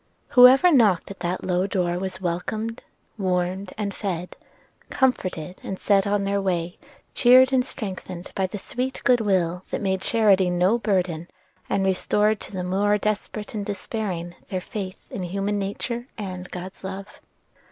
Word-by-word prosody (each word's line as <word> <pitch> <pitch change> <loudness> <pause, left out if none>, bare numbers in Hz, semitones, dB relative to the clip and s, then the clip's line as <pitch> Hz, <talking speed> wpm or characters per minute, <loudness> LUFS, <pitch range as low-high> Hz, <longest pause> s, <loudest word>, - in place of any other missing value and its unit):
Whoever 260 +7 +8
knocked 210 - +4
at 195 - -10
that 175 +1 -2
low 180 +1 +1
door 180 -3 0
was 185 0 -4
welcomed, 200 +6 -3 0.4
warmed, 185 0 -1
and 205 -2 -2
fed; 180 -4 -4 0.5
comforted, 185 - -1
and 190 - -4
set 200 0 +2
on 200 0 +1
their 200 0 0
way, 175 -2 -2 0.3
cheered 255 +1 +6
and 255 -1 +4
strengthened 190 -7 -6
by 190 -1 0
the 195 - -6
sweet 255 +6 -3
good 250 -3 +4
will 180 -4 +1
that - - -2
made 190 -2 -1
charity 200 -5 +3
no 180 +6 +2
burden, 180 -6 0 0.4
and 195 - +1
restored 210 +3 +2
to - - -9
the 185 -2 -3
more 200 +3 +2
desperate 210 0 -3
and 205 -2 -4
despairing 195 -4 -4 0.2
their 185 - -1
faith 190 0 -6
in - - -4
human 195 +3 -1
nature 235 +5 -3
and 185 -3 -6
God's 185 +2 -8
love. 190 +1 -5
195 Hz, 155 wpm, -24 LUFS, 180-215 Hz, 0.5 s, Whoever